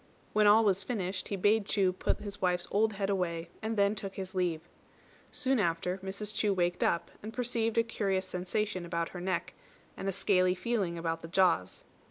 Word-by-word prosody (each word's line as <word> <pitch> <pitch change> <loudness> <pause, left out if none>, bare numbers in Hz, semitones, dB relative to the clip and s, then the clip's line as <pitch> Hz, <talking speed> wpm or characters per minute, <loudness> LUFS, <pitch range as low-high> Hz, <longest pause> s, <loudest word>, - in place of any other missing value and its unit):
When 210 0 +5
all 220 +2 +7
was 195 -1 +2
finished, 190 -4 -3
he 200 - -2
bade 205 +2 +2
Chu 190 -3 +2
put - - -1
his 205 -1 -7
wife's 180 -1 +1
old 215 +2 +2
head 200 0 -1
away, 170 -3 -1
and 220 0 -2
then 200 0 +4
took 195 -2 -6
his 190 0 -6
leave. 175 -4 0 0.7
Soon 265 -3 +1
after 180 0 0
Mrs. 195 +2 -4
Chu 210 -2 +1
waked 175 -1 +1
up, 170 - 0
and 215 - -6
perceived 230 -2 -1
a 230 - +5
curious 195 -4 -1
sensation 185 +1 -2
about 170 -1 -2
her 180 - -7
neck, 185 0 -2 0.4
and 195 - -5
a - - +2
scaly 185 -1 +2
feeling 185 -3 -1
about 165 0 -2
the - - -7
jaws. 170 - +2
195 Hz, 195 wpm, -31 LUFS, 180-210 Hz, 0.7 s, all